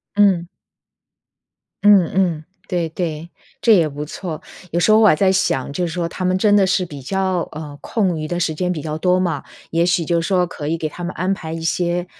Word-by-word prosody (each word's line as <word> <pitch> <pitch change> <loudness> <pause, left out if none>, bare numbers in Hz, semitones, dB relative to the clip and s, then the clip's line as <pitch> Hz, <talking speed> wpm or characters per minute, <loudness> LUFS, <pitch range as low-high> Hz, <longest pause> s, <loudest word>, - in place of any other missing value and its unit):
嗯。 190 -4 +3 1.4
嗯 200 -5 +6
嗯。 175 -5 +1 0.3
对 175 -2 -1
对， 165 -1 -4 0.3
这 230 - +5
也 170 -5 +4
不 145 0 -6
错。 155 +1 -6 0.3
有 170 - +1
时 195 - +3
候 215 - +6
我 220 - +6
还 175 - +6
在 190 +4 +3
想， 140 -8 0
就 175 +3 -1
说 170 0 -3
他 185 - -4
们 185 +1 +2
真 205 +1 +3
的 200 -2 +5
是 185 0 +1
比 145 -4 -9
较 185 +4 -1
呃， 150 -2 -7
空 190 -8 -1
余 155 - -4
的 175 +2 -2
时 160 - 0
间 180 +3 -1
比 155 - -5
较 155 +1 -4
多 180 +2 +2
嘛， 165 -6 -1 0.3
也 170 +1 +2
许 180 -1 +2
就 170 +1 +1
说 180 0 +1
可 150 -3 -7
以 165 +2 0
给 155 -1 -3
他 175 - -10
们 175 - -4
安 185 +4 0
排 160 -4 -6
一 165 - -5
些， 175 +1 0
175 Hz, 235 characters per minute, -20 LUFS, 160-185 Hz, 1.4 s, 嗯